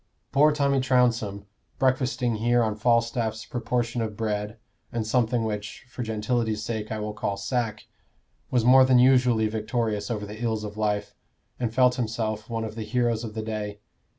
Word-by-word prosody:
Poor 150 +3 +5
Tommy 140 -2 +2
Trounsem, 120 -6 +1 0.3
breakfasting 130 -3 +1
here 120 +2 +3
on 110 -2 -1
Falstaff's 115 0 +1
proportion 120 0 -2
of 110 -2 -4
bread, 105 0 -2 0.3
and 115 -2 -2
something 115 +1 +1
which, 105 0 -5
for 125 - -6
gentility's 110 -1 -1
sake, 110 -1 -4
I 110 - -2
will 105 0 -4
call 100 -1 -2
sack, 110 0 -2 0.6
was 120 -3 +1
more 130 +1 +8
than 130 -1 +5
usually 125 -3 +4
victorious 110 -1 -2
over 105 -3 -3
the 105 +2 -9
ills 110 -2 -1
of 105 -1 -6
life, 105 -1 -1 0.5
and 120 -3 -1
felt 125 +1 +3
himself 110 -2 -2
one 115 -1 -2
of 110 - -5
the 115 - -6
heroes 120 0 0
of 110 -1 -6
the 110 - -3
day. 105 -2 -4
115 Hz, 170 wpm, -26 LUFS, 110-125 Hz, 0.6 s, more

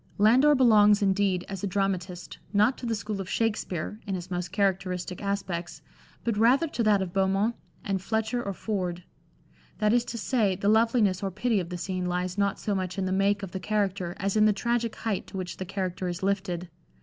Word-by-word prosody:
Landor 255 +8 +5
belongs, 210 -5 +5
indeed, 195 -2 +1
as 195 -1 -6
a - - +1
dramatist, 185 -2 -2
not 210 +6 +4
to 245 - -5
the 230 - 0
school 210 -1 -4
of 185 - -7
Shakspere 210 -4 -2
(in 195 - -1
his 180 0 -7
most 175 -1 -3
characteristic 185 -2 -1
aspects), 195 -4 -3 0.4
but 230 -3 -1
rather 255 +8 +4
to 245 - -2
that 210 -3 +3
of 175 -2 -7
Beaumont 195 +4 +1 0.3
and 195 -2 -1
Fletcher 220 +3 -1
or 200 -4 -3
Ford; 180 -5 -3 0.7
that 210 0 +2
is 240 -1 +3
to 235 - -5
say, 215 -4 +1
the 200 +2 0
loveliness 220 -4 +3
or 195 - -1
pity 210 +3 0
of 175 -2 -4
the 180 - -4
scene 185 0 -3
lies 180 0 -2
not 200 -1 +1
so 210 - -2
much 185 -1 -3
in 190 - 0
the 185 - -1
make 200 +1 +2
of 190 - -5
the 190 - -4
character 190 -3 -1
as 195 +1 -1
in 215 0 +5
the 215 - +5
tragic 235 +1 -1
height 220 -4 -3
to - - -7
which 185 -1 -5
the 185 - -4
character 185 -1 -3
is 175 +1 -4
lifted. 190 -3 -1
200 Hz, 210 wpm, -27 LUFS, 185-215 Hz, 0.7 s, Landor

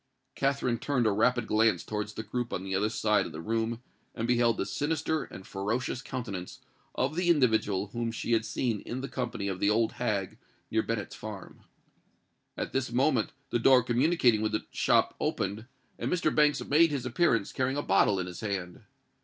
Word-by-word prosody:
Katherine 135 -4 0
turned 130 -5 0
a 110 - +4
rapid 120 +3 +2
glance 110 -5 +2
towards 105 0 -4
the 110 - -5
group 120 +2 -3
on 95 - -3
the 95 0 -4
other 100 +3 +1
side 105 -3 +1
of - - -9
the 80 - -7
room, 115 +5 -2 0.3
and 115 - -2
beheld 120 -1 +3
the - - -1
sinister 155 +1 -1
and 95 - -11
ferocious 115 +6 -2
countenance 105 -10 -6 0.4
of 135 +4 0
the 175 0 +1
individual 110 - +2
whom 115 -1 -2
she 115 - -4
had 115 -1 +3
seen 115 -1 -1
in 125 +5 -5
the 135 - -4
company 120 -7 -3
of 95 -2 -3
the 100 - +2
old 110 +1 +2
hag 105 -6 -2 0.3
near 110 - +3
Bennet's 110 -4 -3
farm. 105 -3 -8 1.0
At - - -4
this 135 -2 -1
moment 125 -2 +2 0.2
the 120 - +1
door 125 +1 +6
communicating 125 -2 +3
with 110 0 -1
the 105 - -1
shop - - +2
opened, 110 +3 -2 0.3
and - - -2
Mr. 165 -3 +1
Banks 150 -1 +3
made 165 +3 +5
his 140 -4 -3
appearance, 125 - +1
carrying 130 +1 0
a 145 - -1
bottle 95 +1 +3
in 90 - -2
his 90 -1 -8
hand. 95 -5 -4
115 Hz, 190 wpm, -29 LUFS, 105-130 Hz, 1.0 s, door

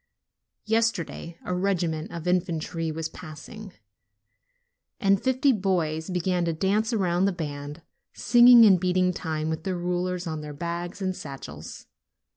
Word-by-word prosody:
Yesterday 220 -7 -1
a 180 - -2
regiment 175 -4 -1
of 170 -2 -7
infan 180 -2 0
try 165 0 -4
was 160 0 -3
passing, 185 +6 -10 1.3
and 195 -3 +3
fifty 260 +2 +3
boys 175 -7 -1
began 180 0 0
to 165 - 0
dance 200 +7 0
around 185 -4 +1
the 200 - +2
band, 150 -2 -6 0.3
singing 240 0 +7
and 190 -4 +6
beating 180 0 +1
time 155 -3 -3
with 160 0 -3
their 185 0 -2
rulers 180 +1 -2
on 160 -2 -4
their 150 -1 -7
bags 170 +5 -5
and 185 -1 -1
satchels. 80 - -9
180 Hz, 140 wpm, -26 LUFS, 160-195 Hz, 1.3 s, singing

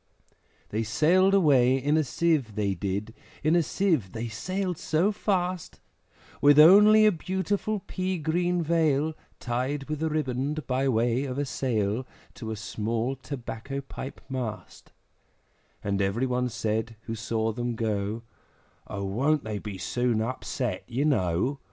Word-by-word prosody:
They 110 - -1
sailed 175 - +3
away 135 -8 +4
in 145 +3 +1
a 155 - +3
Sieve, 145 -6 0
they 100 -2 0
did, 100 +4 -3 0.3
In 155 +3 +3
a 175 - +5
Sieve 160 - 0
they 115 +1 -4
sailed 180 - -3
so 170 +6 +1
fast, 185 -4 -2 0.6
With 145 0 +6
only 210 +7 +8
a 215 - +6
beautiful 195 +4 -2
pea 185 0 -2
green 175 +2 0
veil 160 -2 +2 0.3
Tied 130 +4 -2
with 155 0 -4
a 160 - +1
riband 145 0 -2
by 135 +1 0
way 120 +2 +1
of 130 -1 -4
a 145 - 0
sail, 120 -2 -1 0.3
To 110 - -7
a 110 - -3
small 115 +4 -2
tobacco 130 0 -6
pipe 135 0 -8
mast; 125 -5 -6 0.9
And 100 0 0
every 100 +6 0
one 125 -1 0
said, 110 0 -2
who 115 - -6
saw 110 0 -1
them 120 +1 -3
go, 110 0 -2 0.7
`O 100 0 -4
won't 135 +10 +1
they 105 -1 -4
be 100 -2 -6
soon 120 +5 0
upset, 120 -2 -3
you 130 +4 -1
know! 125 - +1
130 Hz, 145 wpm, -27 LUFS, 110-155 Hz, 0.9 s, only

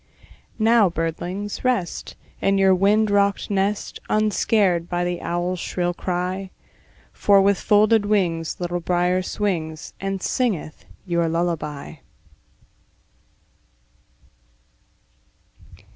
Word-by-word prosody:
Now, 220 -3 +4
birdlings, 175 +5 -4
rest, 245 -9 -1 0.3
In 195 0 +2
your 190 -1 +5
wind 205 +3 +3
rocked 200 0 +1
nest, 200 +1 -1
Unscared 205 -4 +2
by 175 0 -1
the 175 0 -3
owl's 175 +1 -2
shrill 175 0 -2
cry; 185 +2 -3 0.6
For 200 -1 +4
with 195 0 +3
folded 210 0 +3
wings 170 -6 0
Little 175 0 -2
Brier 180 +1 +1
swings, 170 -6 -3
And 195 0 -2
singeth 185 - -2 0.2
your 170 -2 0
lullaby. 160 -4 -3
185 Hz, 95 wpm, -22 LUFS, 175-205 Hz, 0.6 s, your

